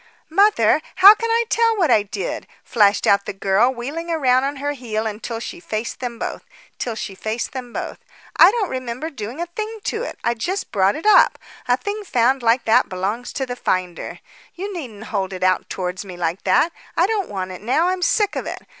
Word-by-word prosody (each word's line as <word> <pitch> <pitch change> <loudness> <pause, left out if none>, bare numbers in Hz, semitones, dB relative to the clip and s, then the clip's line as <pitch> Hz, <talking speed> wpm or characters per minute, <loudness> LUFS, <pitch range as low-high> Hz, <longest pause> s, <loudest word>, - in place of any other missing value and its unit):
"Mother, 330 - +4
how 385 +3 +10
can 460 +1 -3
I 465 +1 +2
tell 455 -1 +2
what 340 -9 +2
I 215 - +5
did?" 395 - -5 0.2
flashed 205 -3 +3
out 200 0 +3
the - - -3
girl, 195 +5 +2
wheeling 280 +7 -5
round 265 -6 +2
on 280 +1 -2
her 285 +1 -2
heel 225 -5 -3
till 230 -1 -5
she 345 - -7
faced 230 -9 -4
them 245 -2 -5
both. - - -5 0.4
"I 235 - -1
don't 425 -3 -1
remember 255 +4 -4
doing 240 +1 -7
a 345 - -1
thing 430 +6 -6
to 440 - -2
it. - - -5
I 235 - +2
just 360 - -3
brought 195 -1 +2
it 320 - -7
up. 425 - +6 0.3
A 245 0 +3
thing 415 +6 -4
found 260 - +2
like 235 +1 +2
that 235 +3 +4
belongs 200 +6 -3
to 265 - -2
the 245 -1 -5
finder. 185 -7 -3 0.3
You 395 +3 -5
needn't 240 - -7
hold 195 -2 -1
it 185 - -5
out 185 0 +1
towards 180 0 -4
me 185 -3 -9
like 170 +1 -2
that. 200 - +3 0.3
I 345 - +5
don't 410 -2 -1
want 185 -2 -4
it 185 - -9
now; 285 - +2
I'm 370 0 -2
sick 410 +3 +2
of - - -3
it. - - -4
250 Hz, 200 wpm, -21 LUFS, 210-350 Hz, 0.4 s, how